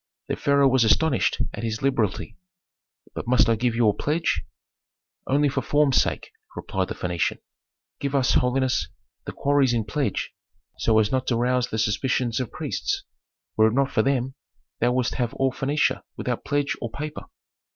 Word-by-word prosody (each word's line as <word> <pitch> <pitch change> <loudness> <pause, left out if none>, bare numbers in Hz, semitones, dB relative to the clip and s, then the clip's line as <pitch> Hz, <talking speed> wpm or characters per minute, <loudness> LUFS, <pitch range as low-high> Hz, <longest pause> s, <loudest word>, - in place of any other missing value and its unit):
The - - 0
pharaoh 140 -1 +3
was 130 -2 +4
astonished 130 +4 +2
at - - -6
this 110 +1 -3
liberality. 115 -5 0 0.8
"But - - -6
must 125 -2 +4
I 115 - +3
give 120 +1 0
you 115 -1 +3
a 105 - +4
pledge?" 155 +9 0 0.9
"Only 145 +2 +3
for 140 - -1
form's 145 -3 +2
sake," - - -3 0.2
replied - - -2
the - - -5
Phœnician. 90 -1 -1 0.6
"Give 140 0 -2
us, 130 -2 +3
holiness, 130 0 +1 0.4
the - - -4
quarries 140 -3 +2
in 115 -2 +1
pledge, 110 0 -2 0.5
so 110 -1 +3
as 110 -2 +3
not 130 -1 0
to 120 - +1
rouse 125 +1 +1
the 110 - -4
suspicions 115 +2 0
of 125 - -3
priests. - - -3 0.5
Were 110 0 +5
it 110 - -1
not 140 0 +2
for 110 - +2
them, 130 0 0 0.5
thou 120 +1 +2
wouldst 125 -1 0
have 120 -3 -1
all 135 -1 +1
Phœnicia 135 0 0 0.2
without 125 -2 -3
pledge 145 -1 0
or 120 - -3
paper." 150 +5 -6
125 Hz, 170 wpm, -24 LUFS, 115-140 Hz, 0.9 s, Were